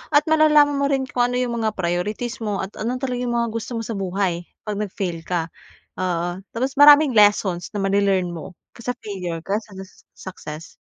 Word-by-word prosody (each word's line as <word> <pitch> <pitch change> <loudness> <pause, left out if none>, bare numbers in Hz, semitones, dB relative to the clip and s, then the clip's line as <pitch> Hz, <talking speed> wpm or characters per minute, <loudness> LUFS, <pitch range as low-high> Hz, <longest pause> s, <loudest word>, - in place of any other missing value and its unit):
at 295 +2 +4
malalaman 300 -2 +5
mo 280 0 +1
rin 265 -1 0
kung 245 -1 0
ano 250 - 0
'yong 245 -2 -1
mga 220 - +1
priorities 210 +8 -2
mo 210 -2 -2
at 190 +2 -5
ano 245 +4 -3
talaga 250 -2 -2
'yong 245 - -1
mga 235 0 +1
gusto 230 +1 -4
mo - - -3
sa 225 - -4
buhay, 190 -2 -1 0.2
'pag 210 - -2
nag-fail 190 -5 -4
ka. 170 -2 -2 0.5
Oo. 175 0 -2
Tapos 260 +4 -2
maraming 290 -2 +7
lessons 205 -4 +3
na 210 - -4
ma-le-learn 195 -1 +2
mo 165 +4 -8 0.3
sa 240 +1 -3
failure, 180 -5 -5
kaysa 210 +5 -3
do'n 190 0 -9
sa - - -22 0.4
success. 155 +1 -8
210 Hz, 195 wpm, -22 LUFS, 185-250 Hz, 0.5 s, maraming